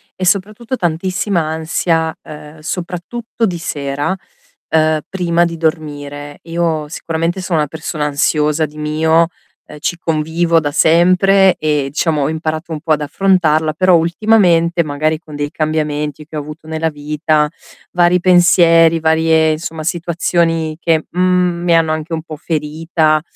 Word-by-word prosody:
e 185 Hz, -, -6 dB
soprattutto 210 Hz, +7 st, 0 dB
tantissima 180 Hz, +2 st, -1 dB
ansia, 160 Hz, +1 st, -1 dB
ehm, 150 Hz, 0 st, -11 dB
soprattutto 180 Hz, +8 st, -4 dB
di 175 Hz, -, -3 dB
sera, 145 Hz, +1 st, -3 dB, 0.5 s
ehm, 155 Hz, -1 st, +2 dB
prima 175 Hz, -2 st, +1 dB
di 165 Hz, -1 st, -4 dB
dormire. 145 Hz, -3 st, -4 dB
Io 165 Hz, -2 st, -1 dB
sicuramente 165 Hz, +3 st, -3 dB
sono 175 Hz, -3 st, -1 dB
una 150 Hz, -, +1 dB
persona 155 Hz, 0 st, -4 dB
ansiosa 150 Hz, +1 st, +1 dB
di 150 Hz, +1 st, -16 dB
mio, 160 Hz, +2 st, +2 dB, 0.4 s
ehm, 150 Hz, -, -12 dB
ci 175 Hz, -, -1 dB
convivo 165 Hz, +1 st, +1 dB
da 145 Hz, -2 st, -2 dB
sempre 185 Hz, +5 st, +4 dB
e 150 Hz, -2 st, 0 dB
diciamo 150 Hz, 0 st, 0 dB
ho 140 Hz, -, 0 dB
imparato 160 Hz, +1 st, -4 dB
un 150 Hz, -, -5 dB
po' 160 Hz, -1 st, -3 dB
ad 150 Hz, -, -1 dB
affrontarla, 155 Hz, -1 st, +2 dB
però 185 Hz, +2 st, +4 dB
ultimamente, 170 Hz, -1 st, +3 dB
magari 155 Hz, +1 st, -1 dB
con 155 Hz, -2 st, -12 dB
dei 145 Hz, 0 st, -3 dB
cambiamenti 150 Hz, -1 st, -2 dB
che 155 Hz, -, -11 dB
ho -, -, -1 dB
avuto 150 Hz, +2 st, -9 dB
nella 160 Hz, 0 st, -1 dB
vita, 150 Hz, 0 st, 0 dB, 0.4 s
vari 175 Hz, 0 st, +3 dB
pensieri, 170 Hz, -2 st, +5 dB
varie 160 Hz, 0 st, +3 dB
insomma 160 Hz, 0 st, -4 dB
situazioni 165 Hz, -1 st, -1 dB
che, 160 Hz, -2 st, +1 dB
mhmm, 180 Hz, -1 st, +1 dB
mi 175 Hz, -1 st, +2 dB
hanno 165 Hz, -1 st, +2 dB
anche 155 Hz, +1 st, -5 dB
un 160 Hz, -, -2 dB
po' 160 Hz, -2 st, -8 dB
ferita, 155 Hz, 0 st, 0 dB
160 Hz, 145 wpm, -16 LUFS, 155-175 Hz, 0.5 s, pensieri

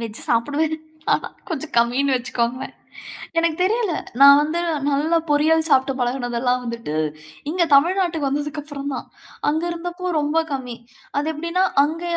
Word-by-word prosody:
Veg 225 Hz, -2 st, -6 dB
சாப்டுவேன். 290 Hz, +7 st, +1 dB, 0.7 s
கொஞ்சம் 315 Hz, -2 st, -5 dB
கம்மின்னு 260 Hz, +4 st, +2 dB
வச்சுக்கோங்க. 240 Hz, 0 st, -2 dB, 0.7 s
எனக்கு 330 Hz, -1 st, +1 dB
தெரியல 425 Hz, -1 st, +1 dB, 0.3 s
நான் 280 Hz, 0 st, +9 dB
வந்து 310 Hz, +3 st, -1 dB, 0.3 s
நல்லா 300 Hz, +4 st, +2 dB
பொரியல் 315 Hz, +2 st, +3 dB
சாப்ட்டு 270 Hz, -1 st, +3 dB
பழகினதெல்லாம் 245 Hz, 0 st, 0 dB
வந்துட்டு 235 Hz, -9 st, -5 dB, 0.6 s
இங்க 345 Hz, +2 st, +1 dB
தமிழ்நாட்டுக்கு 330 Hz, -1 st, +2 dB
வந்ததுக்கப்புறந்தான். 290 Hz, -1 st, -4 dB, 0.4 s
அங்க 315 Hz, +3 st, +1 dB
இருந்தப்போ 355 Hz, +2 st, -4 dB
ரொம்ப 295 Hz, +2 st, 0 dB
கம்மி. 250 Hz, -3 st, -4 dB, 0.4 s
அது 305 Hz, +2 st, 0 dB
எப்டின்னா 335 Hz, +4 st, 0 dB, 0.2 s
அங்க 320 Hz, +3 st, -3 dB
290 Hz, 120 wpm, -21 LUFS, 260-325 Hz, 0.7 s, நான்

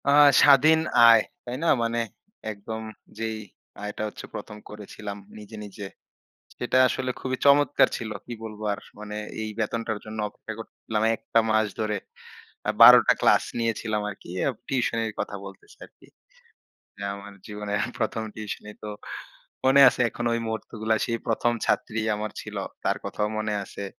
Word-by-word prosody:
আ -, -, +6 dB, 0.3 s
স্বাধীন 145 Hz, +3 st, +7 dB, 0.3 s
আয়, 115 Hz, -1 st, +8 dB, 0.2 s
তাই 120 Hz, 0 st, -4 dB
না? 170 Hz, -, +3 dB
মানে 115 Hz, 0 st, 0 dB, 0.5 s
একদম 110 Hz, +2 st, -6 dB, 0.4 s
যেই 110 Hz, 0 st, -3 dB, 0.5 s
আয়টা 105 Hz, +1 st, -5 dB
হচ্ছে 105 Hz, -, -9 dB
১ম 105 Hz, -, -7 dB
করেছিলাম 105 Hz, 0 st, -8 dB, 0.2 s
নিজে, 105 Hz, +1 st, -10 dB
নিজে 100 Hz, 0 st, -8 dB, 0.7 s
সেটা 125 Hz, +1 st, 0 dB
আসলে 130 Hz, 0 st, -2 dB
খুবই 130 Hz, 0 st, -2 dB
চমৎকার 145 Hz, +1 st, +5 dB
ছিল। 110 Hz, -2 st, -5 dB
কি 120 Hz, -, -6 dB
বলবো 110 Hz, -1 st, -7 dB
আর? 100 Hz, -, -7 dB, 0.2 s
মানে 105 Hz, 0 st, -7 dB, 0.3 s
এই 110 Hz, -, -3 dB
বেতনটার 110 Hz, 0 st, -2 dB
জন্য 110 Hz, 0 st, -7 dB
অপেক্ষা 110 Hz, -, -9 dB
করতেছিলাম 110 Hz, -1 st, -4 dB
একটা 115 Hz, -, +1 dB
মাস 110 Hz, 0 st, +3 dB
ধরে। 105 Hz, -1 st, 0 dB, 0.7 s
আ -, -, +5 dB
১২ -, -, +12 dB
টা -, -, +7 dB
ক্লাস -, -, +4 dB
নিয়েছিলাম 115 Hz, -2 st, -1 dB
আরকি 95 Hz, -, -12 dB, 0.4 s
টিউশনের 115 Hz, -4 st, 0 dB
কথা -, -, -3 dB
বলতেছি 410 Hz, +1 st, -13 dB
আরকি। -, -, -23 dB, 0.9 s
যে 100 Hz, -, -13 dB
আমার 100 Hz, 0 st, -10 dB
জীবনের 105 Hz, -1 st, -3 dB, 0.2 s
১ম 110 Hz, -1 st, -1 dB
টিউশনি। 105 Hz, -1 st, -6 dB
তো 105 Hz, -, -5 dB, 0.8 s
মনে 135 Hz, +1 st, +6 dB
আছে 125 Hz, -, -3 dB
এখন 120 Hz, -, -5 dB
ওই 115 Hz, -, 0 dB
মুহূর্তগুলা। 110 Hz, 0 st, -2 dB
সেই 115 Hz, -1 st, -1 dB
১ম 120 Hz, +1 st, +1 dB
ছাত্রী 110 Hz, 0 st, 0 dB, 0.2 s
আমার 105 Hz, +1 st, -4 dB
ছিল, -, -, -8 dB, 0.3 s
তার -, -, +2 dB
কথাও 105 Hz, -, -1 dB
মনে 110 Hz, -1 st, -1 dB
আছে। 100 Hz, -, -8 dB
110 Hz, 155 wpm, -26 LUFS, 105-115 Hz, 0.9 s, ১২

